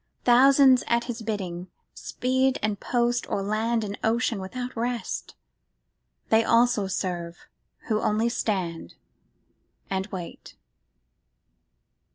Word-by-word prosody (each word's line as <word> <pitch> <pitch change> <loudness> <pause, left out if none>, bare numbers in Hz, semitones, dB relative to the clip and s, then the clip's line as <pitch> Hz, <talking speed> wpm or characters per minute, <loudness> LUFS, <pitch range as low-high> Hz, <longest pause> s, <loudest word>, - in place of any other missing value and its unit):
Thousands 260 +1 +6
at 235 0 +2
His 240 -1 -5
bidding 190 -5 -4 0.3
speed 260 +1 0
And 210 -2 -1
post 240 0 0
o'er 195 - -1
land 220 +3 0
and 205 -1 -5
ocean 230 -1 +1
without 250 +6 -6
rest: 240 0 -3 0.9
They 220 +1 +4
also 230 -3 +3
serve 175 -3 -3 0.5
who 215 -1 0
only 215 +2 +1
stand 190 -8 -3 1.0
and 190 0 -1
wait. 185 -5 -8
225 Hz, 105 wpm, -26 LUFS, 195-245 Hz, 1.0 s, Thousands